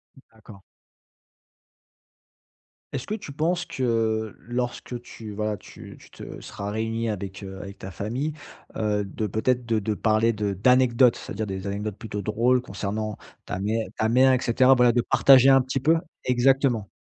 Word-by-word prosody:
Mmh 135 - -17
d'accord. 110 -2 -15 2.3
Est-ce 135 -3 -4
que 215 - -2
tu 200 -9 -8
penses 170 +4 0
que 115 - -1
lorsque 120 0 -4
tu 110 -3 -10
voilà, 105 0 -2
tu - - -13
tu - - -17
te - - -9
seras 100 0 -7
réunie 115 +1 -2
avec, 100 -1 -5
heu, 95 0 -8
avec 100 0 -9
ta 95 - -7
famille, 120 - -3 0.4
heu, 105 -1 0
de 105 +2 -4
peut-être 120 +4 0
de 115 -2 +1
de 105 +1 -2
parler 110 +2 +2
de 105 -2 -2
d'anecdotes, 125 +3 +4
c'est-à-dire 110 - -5
des 95 0 -5
anecdotes 105 +1 -4
plutôt 105 -3 -5
drôles 120 +5 +2
concernant 105 -1 -4 0.3
ta 90 - -4
mère 110 +3 -1
ta 110 - +1
mère 130 +3 +5
et 130 - +2
cetera, 130 +2 +4
voilà 125 -1 +5
de 120 0 +2
partager 135 +1 +6
un 135 0 +6
petit 130 +1 -2
peu 160 +5 +3 0.3
exactement. 125 -3 +2
115 Hz, 165 wpm, -25 LUFS, 105-125 Hz, 2.3 s, partager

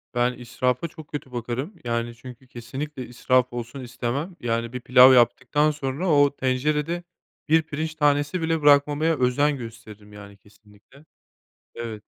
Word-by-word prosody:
Ben 120 +1 +2
israfa 125 +4 -2
çok 160 -2 -13
kötü 140 -3 -7
bakarım. 125 - -4
Yani, 115 0 -2
çünkü 125 +2 -13
kesinlikle 130 +3 -7
israf 125 +1 +1
olsun 120 +3 -6
istemem. 130 +7 -4
Yani, 115 0 -2
bir 125 - -4
pilav 125 +2 +7
yaptıktan 130 +4 +3
sonra 145 +4 -3
o 145 -2 +4
tencerede 150 +6 -1 0.5
1 160 +1 +5
pirinç 155 +1 -4
tanesi 145 +3 +1
bile 160 -1 0
bırakmamaya 145 +2 +4
özen 140 +4 +2
gösteririm. 110 -3 -11
Yani, 100 -1 -12
kesinlikle. 105 +7 -22 0.7
Evet. 110 -3 -6
130 Hz, 140 wpm, -24 LUFS, 120-150 Hz, 0.7 s, pilav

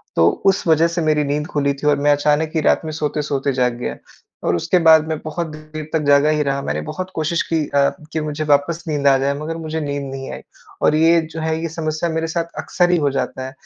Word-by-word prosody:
तो 85 0 +5 0.2
उस 195 0 +3
वजह 160 +1 +4
से 170 +1 -2
मेरी 155 -1 +2
नींद 145 +1 -1
खुली 140 -1 0
थी 140 +2 -4
और 145 -1 +4
मैं 145 +1 +3
अचानक 150 +2 +2
ही 160 - +2
रात - - +3
में 155 - -4
सोते-सोते 150 -2 -1
जाग 125 -1 +1
गया। - - -3 0.5
और - - +2
उसके 180 - +1
बाद 160 -1 +7
मैं 160 -1 -2
बहुत 165 +2 -3
देर 155 0 -8
तक 160 - +2
जागा 145 +1 +5
ही 150 -1 +2
रहा। 140 -1 -1
मैंने 75 - -2
बहुत 185 - -5
कोशिश 160 +1 0
की 165 - +2
अ, 140 0 +3 0.2
कि 160 - -1
मुझे 150 0 -3
वापस 150 +3 +1
नींद 145 -2 0
आ 135 -1 +6
जाए, 135 +1 0
मगर 160 +2 -4
मुझे 160 -1 -4
नींद 145 -1 -3
नहीं 135 0 -6
आई। - - -7 0.4
और 150 - +3
ये 165 +2 +4
जो 160 0 -8
है, 160 0 -1
ये 165 - -3
समस्या 155 +1 -2
मेरे 160 0 -1
साथ 165 +1 -2
अक्सर 175 -1 +1
ही 175 - +4
हो 145 -3 +1
जाता 130 -1 -3
है। 130 - -6
155 Hz, 245 wpm, -19 LUFS, 140-160 Hz, 0.5 s, बाद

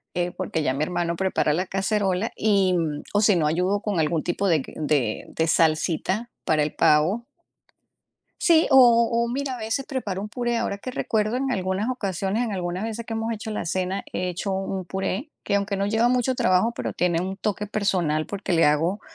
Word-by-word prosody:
eh, 175 0 0
porque 165 -4 -3
ya 130 - +1
mi 140 - -1
hermano 170 0 -1
prepara 185 -5 +1
la 180 +3 -1
cacerola 195 +1 0
y, 200 -3 +2
mm, 155 -4 -1
o 205 - +3
si 205 -3 +5
no 160 -3 +1
ayudo 180 +6 +1
con 205 -6 -1
algún 155 0 +1
tipo 195 +3 -1
de 165 -5 +3
q - - -11
de 145 -8 0
de 160 - -1
salsita 165 +8 +1
para 155 -1 +2
el 150 - -3
pavo. 175 +10 +3 1.2
Sí, 330 -2 +4
o 265 - +7 0.3
o 235 0 +1
mira, 265 +1 -2
a - - -7
veces 225 +5 -2
preparo 210 -9 -3
un 210 - -5
puré, 240 +1 -1
ahora 200 - -2
que 255 - -6
recuerdo 220 -2 -1
en 270 +1 -1
algunas 190 +1 -1
ocasiones, 200 -2 -1
en 225 - -3
algunas 180 +1 -3
veces 225 +1 -5
que 225 - -4
hemos 225 +1 -2
hecho 220 0 -5
la 210 - -3
cena, 185 +3 -2
he 180 - -2
hecho 180 +3 -3
un 190 -1 -3
puré 195 - -3
que, 200 - -1
aunque 200 0 -1
no 195 - 0
lleva 225 +3 +2
mucho 250 +1 +1
trabajo, 185 +2 +2
pero - - -4
tiene 175 -1 +1
un 190 +1 -4
toque 210 +1 -2
personal 180 -7 0
porque 200 -2 -4
le 165 -1 +4
hago, 165 +7 +1
195 Hz, 205 wpm, -24 LUFS, 175-220 Hz, 1.2 s, o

